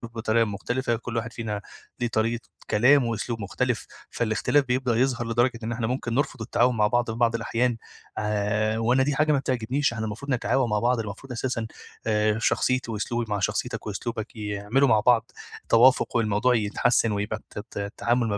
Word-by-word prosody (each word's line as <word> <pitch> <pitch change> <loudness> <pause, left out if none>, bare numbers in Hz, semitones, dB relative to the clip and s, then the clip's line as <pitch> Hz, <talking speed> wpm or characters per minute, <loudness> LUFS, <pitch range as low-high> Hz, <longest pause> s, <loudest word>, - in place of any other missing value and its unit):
بطريقة 115 +1 +2
مختلفة، 120 +4 -2
كل 115 +1 -5
واحد 115 0 -3
فينا 105 -3 -4 0.4
ليه 120 - 0
طريقة 115 +1 0 0.3
كلام 125 +5 +5
وأسلوب 115 0 -3
مختلف، 100 - -2 0.2
فالاختلاف 120 +5 +1
بيبدأ 125 -1 0
يظهر 120 -1 +1
لدرجة 120 0 +2
إن 115 - -3
إحنا 115 -1 -2
ممكن 125 -1 -2
نرفُض 130 -3 -1
التعاون 125 +2 +2
مع 105 -1 +4
بعض 120 +1 +1
في 110 - -6
بعض 115 -1 +2
الأحيان 115 +1 0 0.4
آآ، 105 +1 0
وأنا 120 +4 +3
دي 145 +1 0
حاجة 155 +2 +3
ما 145 - +3
بتعجبنيش، 130 +1 0
إحنا 110 -1 -3
المفروض 110 +7 -5
نتعاون 125 0 +1
مع 105 0 +1
بعض، 120 +2 +2
المفروض 110 +5 -6
أساسًا 115 -1 -2 0.4
آآ، 105 0 +2
شخصيتي 130 +1 +1
وأسلوبي 115 +2 -2
مع 105 -1 -1
شخصيتك 95 - -2
وأسلوبك 110 +2 -5
يعملوا 105 +5 0
مع 110 -3 +4
بعض 115 +1 +3 0.4
توافُق 125 +3 +5
والموضوع 115 +2 +2
يتحسِّن 115 +1 +2
ويبقى 105 +1 -2 0.2
الت - - -1
ت - - -9
التعامل 115 +4 0
ما 105 -2 -1
115 Hz, 175 wpm, -25 LUFS, 110-125 Hz, 0.4 s, كلام